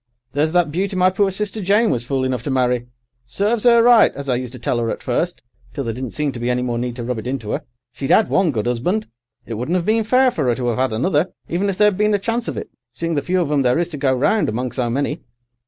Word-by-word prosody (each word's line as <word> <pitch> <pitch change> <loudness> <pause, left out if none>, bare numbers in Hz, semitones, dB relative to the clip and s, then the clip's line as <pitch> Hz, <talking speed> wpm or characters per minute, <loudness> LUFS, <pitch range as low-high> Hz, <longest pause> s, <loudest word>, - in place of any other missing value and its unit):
There's 150 +3 +1
that 175 -4 +2
beauty 190 +4 -1
my 185 0 +4
poor 195 +1 +2
sister 210 +2 -4
Jane 205 +4 +3
was 120 0 -2
fool 135 -1 0
enough 130 -2 -1
to 135 - -5
marry. 125 -2 +1 0.4
Serves 210 - 0
'er 235 -1 +6
right, 240 -2 +6
as 140 0 -7
I - - +3
used 125 -1 -4
to - - -7
tell 120 0 -1
'er 115 - -1
at - - -4
first, 170 +8 -2 0.3
till 140 - -2
there 115 -2 -3
didn't 130 +2 -5
seem 150 +2 -2
any 125 +1 0
more 120 -1 -2
need 120 0 -3
to 120 - -5
rub 120 -1 -3
it 110 - -7
into 125 -5 -3
'er. - - -2 0.3
She'd 135 +2 -3
'ad 220 - +5
one 190 -3 +2
good 115 -7 -2
'usband. 155 - 0 0.4
It 115 - -6
wouldn't 125 +11 -1
'ave 170 - -2
been 220 +1 +2
fair 255 +3 +3
for 150 - -1
'er 120 - +2
to 125 -1 -1
'ave 120 +2 -1
'ad 130 -4 0
another, 150 +7 +1 0.2
even 190 +4 -1
if 190 - -3
there'd 210 -2 +3
been 210 0 +3
a - - +3
chance 230 +4 -2
of - - -4
it, - - -6 0.2
seeing 165 +6 -3
the 145 - 0
few 185 +5 0
of 155 -4 -2
'em 145 -2 +2
there 125 +1 +2
is 170 +1 0
to 155 - -6
go 135 -1 +1
round 140 - +2
among 120 +3 -2
so 125 -3 -2
many. 140 +5 -2
145 Hz, 275 wpm, -20 LUFS, 125-195 Hz, 0.4 s, er